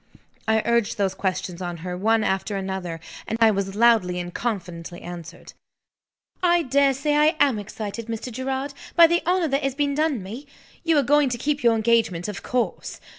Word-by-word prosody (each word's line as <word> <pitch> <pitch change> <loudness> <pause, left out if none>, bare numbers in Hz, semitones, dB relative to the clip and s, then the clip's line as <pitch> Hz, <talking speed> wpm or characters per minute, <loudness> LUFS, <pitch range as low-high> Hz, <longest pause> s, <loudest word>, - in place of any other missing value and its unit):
I 220 0 +2
urged 235 -2 +1
those 195 -2 +1
questions 185 -2 -3
on 175 -1 -4
her, 180 -1 -3
one 220 +4 +2
after 195 +1 -1
another; 190 -3 -4 0.3
and 225 - -2
I 225 -1 +6
was 195 -1 -2
loudly 215 -6 +3
and 175 0 -6
confidently 175 -7 -4
answered. 175 -2 -9 0.9
"I 345 -1 +3
dare 275 0 +3
say 295 +3 0
I 305 +2 +4
am 270 -7 +3
excited, 215 +2 -6
Mr. 230 +2 -5
Gerard, 265 +3 -3 0.2
by 340 - +9
the 340 +1 +2
honor 360 -2 +2
that 275 +1 +1
has 275 -2 -1
been 285 -1 0
done 295 -7 0
me. 235 +10 -8 0.4
You 330 -2 +3
are 285 - +4
going 290 +1 +3
to 240 - -2
keep 290 +4 -1
your 235 -1 +5
engagement, 220 -6 +1
of 210 -3 -5
course? 250 -1 -2
230 Hz, 185 wpm, -24 LUFS, 190-280 Hz, 0.9 s, by